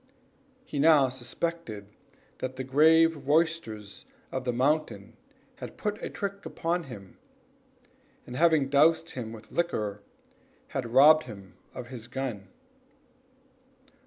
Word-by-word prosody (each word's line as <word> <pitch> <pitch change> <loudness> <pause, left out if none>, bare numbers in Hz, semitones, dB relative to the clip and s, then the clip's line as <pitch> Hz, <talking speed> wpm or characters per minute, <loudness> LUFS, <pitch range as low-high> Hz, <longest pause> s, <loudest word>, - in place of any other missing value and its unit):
He 145 - -5
now 145 -3 +5
suspected 125 -2 -5 0.5
that 130 0 -4
the 130 - -4
grave 155 +2 +4
roisterers 145 -10 0 0.3
of 130 -1 -4
the 125 - +1
mountain 120 -5 -1 0.4
had - - -9
put 210 0 -3
a - - -4
trick 200 0 -5
upon 170 0 -2
him, 100 -7 -12 1.1
and, 125 - -8
having 160 -2 +3
dosed 160 +4 +3
him 115 -4 -6
with 110 -1 -12
liquor, 105 -12 -2 0.7
had 120 -3 -4
robbed 150 +5 +7
him 100 -6 -11 0.2
of 120 -1 -7
his 120 -3 -8
gun. 120 -6 -5
135 Hz, 120 wpm, -28 LUFS, 115-160 Hz, 1.1 s, robbed